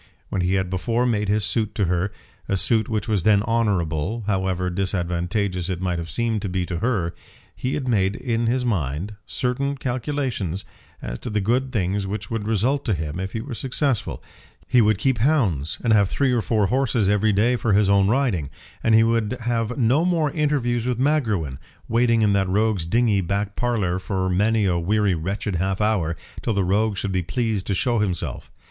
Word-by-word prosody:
When 95 - -1
he 90 +2 +1
had 95 -1 -1
before 115 +6 0
made 105 -4 0
his 105 0 +1
suit 110 -1 -1
to 100 - +1
her, 90 +3 0 0.4
a 100 - +2
suit 110 +2 +1
which 110 -2 -2
was 105 -4 +1
then 100 +2 +4
honourable, 105 -3 0
however 95 -3 0
disadvantageous 90 0 -1
it 90 -2 -2
might 90 -2 -1
have 85 0 -5
seemed 115 +4 -1
to 100 - -3
be 90 0 -1
to 85 -1 -4
her 95 -7 0 0.4
he 130 - -2
had 135 -3 -3
made 100 -4 +2
in 115 -2 -1
his 125 +2 +1
mind 90 - -1
certain 140 +2 -1
calculations 125 - -2 0.4
as - - -5
to - - -6
the 105 -1 0
good 125 +6 0
things 100 -3 -1
which 105 +1 -5
would 110 -2 -2
result 120 +6 +1
to 110 -6 +1
him 80 +1 -4
if 95 0 -4
he 110 - -2
were 130 +1 -7
successful 130 -1 -1 0.4
He 125 - +4
would 105 -2 +3
keep 125 +2 +1
hounds, 105 - +1
and 115 -2 +3
have 100 -3 +4
three 135 -2 +1
or 120 -2 +2
four 110 -2 +1
horses 120 -2 +1
every 105 +2 +3
day 110 +5 +3
for 115 -3 0
his 105 0 +4
own 100 -1 +4
riding, 110 - +1 0.3
and 115 - +4
he 110 - +6
would 115 +1 +1
have 115 0 -1
no 130 +5 +3
more 165 -5 +1
interviews 130 -7 0
with 125 -2 0
Magruin, 110 - 0 0.3
waiting 115 -1 +3
in 105 -1 +3
that 95 -1 +1
rogue's 100 -3 +1
dingy 110 -1 +2
back 100 +3 -2
parlour 105 -7 0
for 95 -1 -2
many 105 +3 +2
a 90 -3 +1
weary 100 +3 +2
wretched 95 +3 -2
half 95 +2 -1
hour, 100 -7 +1 0.3
till 115 - -1
the 100 - +2
rogue 100 +3 +1
should 100 - -2
be 95 -1 0
pleased 110 +1 -2
to 100 - 0
show 120 +3 +1
himself. 95 -4 -3
105 Hz, 200 wpm, -23 LUFS, 95-120 Hz, 0.4 s, he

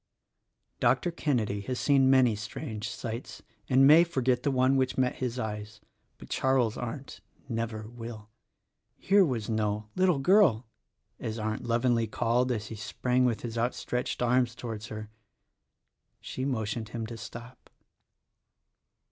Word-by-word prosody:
Dr. 175 - +2
Kenedy 115 -11 -1
has 130 -1 -2
seen 135 -2 +4
many 130 -4 +5
strange 105 +1 -5
sights 115 +1 -6 0.3
and 135 +1 +6
may 155 +4 +8
for 170 -7 -2
get 125 0 +2
the 140 - 0
one 130 0 +3
which 130 -1 +1
met 130 -1 +1
his 125 -1 -3
eyes; 110 -1 -5 0.4
but - - -12
Charles 130 -4 +1
Arndt 125 +3 -6 0.3
never 115 -3 -3
will. 115 -2 -9 0.7
Here 200 +1 +4
was 125 - -1
no 105 -1 -1
"Little 185 -4 +3
Girl" 135 - +4 0.5
as 110 0 -4
Arndt 110 0 -3
lovingly 120 -1 +2
called 120 +3 +1
as 110 -2 -3
he 110 - -6
sprang 125 +4 0
with 120 -1 0
outstretched 125 +1 -2
arms 125 -1 +2
towards 110 -4 -6
her! 110 0 -7 1.1
She 130 - -5
motioned 110 -4 -2
him 115 -1 -4
to 115 +1 -7
stop. 120 +2 -10
120 Hz, 140 wpm, -29 LUFS, 110-130 Hz, 1.1 s, may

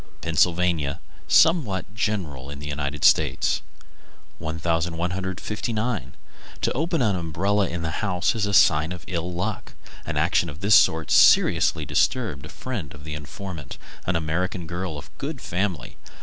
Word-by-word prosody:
Pennsylvania; 85 -2 +1 0.3
somewhat 115 - +3
general 90 -12 -2
in 70 - -7
the 70 - -9
United 70 0 -3
States. - - +3 0.8
1159. 90 +8 -2 0.5
To - - +1
open 160 0 0
an 105 -4 +2
umbrella 95 +4 0
in 85 -1 -4
the 80 - -2
house 90 -1 0
is 110 -3 -1
a 100 - -2
sign 80 -1 +5
of 90 - -9
ill 90 -1 -3
luck. 90 +1 -4 0.3
An - - -4
action 85 - +2
of 75 +4 -10
this 100 +2 +3
sort 80 -5 +4
seriously 80 -2 +5
disturbed 75 - 0
a - - -15
friend 110 - -6
of 75 - -13
the 75 0 -6
informant, 75 0 -7 0.3
an 90 - +1
American 85 +2 -1
girl 85 -1 -4
of 70 - -12
good 140 0 -4
family. 90 - -3
85 Hz, 145 wpm, -24 LUFS, 80-100 Hz, 0.8 s, sign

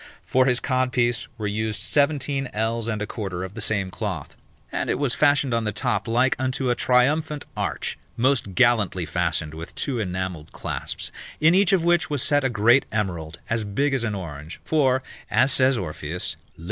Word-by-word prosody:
For 130 0 +2
his 125 -1 +3
codpiece 125 -4 +1
were 110 - -4
used 110 +1 -1
sixteen 140 -2 +1
ells 115 +1 -1
and 105 -2 -2
a - - -2
quarter 95 -5 -4
of 95 +1 -6
the 115 - -5
same 100 -3 0
cloth, 95 -8 -5 0.4
and - - -2
it - - +1
was 135 -3 0
fashioned 145 -3 +3
on 115 -1 +1
the 105 - -1
top 105 0 -1
like 120 +3 +3
unto 130 -1 0
a - - +2
triumphant 145 +5 +2
arch, - - -3 0.2
most 120 -6 +1
gallantly 110 -8 +3
fastened 80 -3 -1
with 80 +2 -8
two 130 -4 -1
enamelled 90 -5 -4
clasps, - - -4 0.3
in 160 +2 +5
each 195 -1 +4
of 190 -4 +3
which 175 0 +3
was 145 -3 +1
set 145 0 +3
a 130 - +2
great 120 +3 +4
emerald, 85 -7 -2
as 115 -1 0
big 135 +8 0
as 130 -3 +1
an 110 -3 -1
orange; 80 -4 -7
for, 130 -4 +2 0.3
as 125 +7 +3
says 130 0 +3
Orpheus, 80 -2 -3 0.2
lib. - - -19
115 Hz, 185 wpm, -24 LUFS, 100-135 Hz, 0.4 s, in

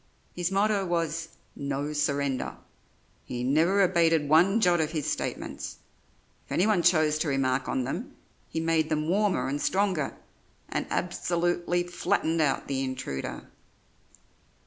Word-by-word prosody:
His 175 0 -1
motto 200 +1 +2
was 165 -2 -1 0.3
"No 140 +1 -3
surrender"; 140 -2 -1 0.7
he 120 0 -5
never 165 +9 +3
abated 165 -4 +3
one 175 +8 +5
jot 175 -5 +3
of 155 +1 -2
his 155 -3 -2
statements; - - -4 0.7
if - - -20
anyone 200 0 +3
chose 155 -3 +3
to 160 - 0
remark 135 -2 0
on 130 - 0
them, 195 - -5 0.3
he 160 - -3
made 160 -1 +1
them 155 -1 0
warmer 200 +2 +1
and 145 +2 -2
stronger, 190 -7 0 0.5
and - - -2
absolutely 175 0 0
flattened 165 -2 0
out 145 -3 +1
the 135 -1 -1
intruder. 130 - -5
165 Hz, 130 wpm, -28 LUFS, 145-175 Hz, 0.7 s, one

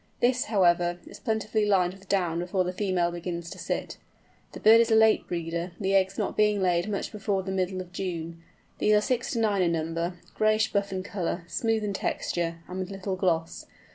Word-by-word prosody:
This, 250 +1 +2
however, 175 -4 +2
is - - -12
plentifully 220 -1 0
lined 185 -3 +3
with 195 0 -17
down 175 -4 +1
before 185 +2 0
the 180 0 -3
female 185 -3 0
begins 170 -1 -5
to - - -9
sit. - - -3 0.6
The - - -7
bird 225 +2 +7
is 230 - +1
a 220 - +4
late 220 0 +4
breeder, 170 0 -3
the 195 -1 0
eggs 190 0 +2
not - - -2
being 210 -1 +3
laid 180 0 +1
much 200 - -3
before 200 -2 -1
the 190 - -4
middle 185 0 -1
of 180 -1 -11
June. 170 -3 -4 0.4
These 215 - +4
are 210 - +4
six 250 +2 -1
to 235 - -1
nine 210 -3 +2
in 170 -2 +2
number, 165 +2 -2 0.2
grayish 215 0 +2
buff 200 -1 0
in 185 -1 -3
colour, 180 -3 -3
smooth 225 +3 0
in 205 -1 -2
texture, 165 -3 -2
and 185 +1 -6
with 185 0 -3
little 195 -1 -4
gloss. 165 -3 -1
190 Hz, 205 wpm, -27 LUFS, 175-210 Hz, 0.6 s, bird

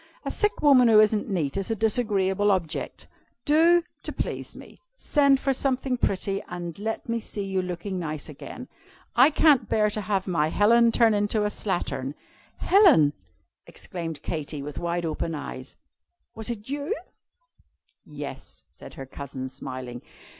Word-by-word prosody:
A - - -2
sick 420 -6 0
woman 265 -4 +7
who 220 -2 +7
isn't 215 0 +3
neat 170 -5 -1
is 195 +1 -2
a 225 - 0
disagreeable 205 -3 +1
object. 180 -5 -2 0.4
Do, 335 +3 +5 0.2
to - - -5
please - - -5
me, - - -14
send 280 - +3
for 270 0 +1
something 265 -1 -1
pretty, 195 -3 -1
and 175 0 -6
let 220 +2 -4
me 230 0 -1
see 210 -2 -5
you 190 -1 -1
looking 180 +1 -4
nice 155 -3 -4
again. 165 - -9 0.5
I 255 +4 +7
can't 300 -3 +4
bear 210 -1 +2
to 215 - -3
have 195 -1 -1
my 165 -5 +1
Helen 230 +7 +4
turn 225 -1 +4
into 205 +1 +1
a 210 - 0
slattern.'" 145 -10 -3 0.4
"Helen!" 340 - +5 0.5
exclaimed 165 -4 -6
Katy, 150 -2 -4
with 145 -1 -6
wide 170 0 -2
open 160 +1 -3
eyes, 145 - -8 0.6
"was 220 0 -4
it 220 -3 -5
you?" 285 +9 -2 1.1
"Yes," - - -9
said - - -13
her 135 - -7
cousin, 130 -1 -7
smiling. 130 -2 -7
205 Hz, 155 wpm, -25 LUFS, 165-235 Hz, 1.1 s, woman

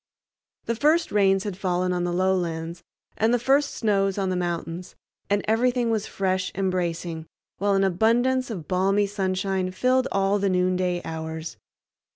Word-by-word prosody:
The 230 - 0
first 310 +8 +2
rains 195 -2 +3
had 205 -3 -4
fallen 180 -1 0
on 175 0 -1
the 175 - -1
lowlands, 175 -2 -1 0.4
and 220 +2 +2
the 245 - +4
first 275 +4 +2
snows 195 -3 +1
on 190 -2 0
the - - 0
mountains, 175 0 -4 0.3
and 205 0 +1
everything 240 +1 +2
was 220 -2 -1
fresh 185 -1 -1
and 190 0 0
bracing, 170 -2 -3 0.3
while 200 0 +2
an 195 - +3
abundance 240 +7 +2
of 175 -10 -6
balmy 195 +2 +2
sunshine 190 -1 -1
filled 255 +7 +1
all 195 +1 +2
the 200 0 +1
noonday 180 -1 0
hours. 160 0 -5
190 Hz, 160 wpm, -25 LUFS, 180-210 Hz, 0.4 s, the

